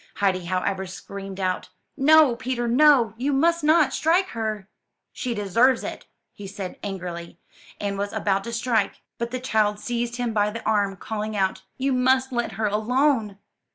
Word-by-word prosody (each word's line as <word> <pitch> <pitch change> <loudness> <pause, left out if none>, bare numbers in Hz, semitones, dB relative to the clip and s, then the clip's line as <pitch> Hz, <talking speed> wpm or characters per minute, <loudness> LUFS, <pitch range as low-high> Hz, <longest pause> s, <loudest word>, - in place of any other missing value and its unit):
Heidi, 185 -3 0
however, 190 +2 -1
screamed 195 +1 -8
out: 185 -1 -2 0.3
''No, 295 -2 +5
Peter, 245 -1 -2
no! 250 -3 +5
you 270 +4 0
must 335 +4 +2
not 305 -2 +4
strike 355 +4 +2
her!'' 215 -4 -4 0.5
*'She 245 -3 -3
deserves 230 +6 +2
it," - - -7 0.4
said 195 -1 -6
he - - -25
angrily, 175 -4 -6 0.4
and 200 -1 -3
was 200 0 -2
about 195 -1 0
to 235 - -5
strike; 230 -3 -1 0.2
but 235 0 -2
the 255 +1 -4
child 215 -4 +1
seized 240 +1 -3
him 240 -2 -2
by 210 -1 +2
the 230 +2 -7
arm, 205 -2 +1
calling 215 +1 -4
out, 190 -1 0 0.2
*'You 270 +1 0
must 260 +1 +2
let 240 -1 -2
her 215 +2 -2
alone!" 220 0 +1
220 Hz, 165 wpm, -24 LUFS, 200-255 Hz, 0.5 s, No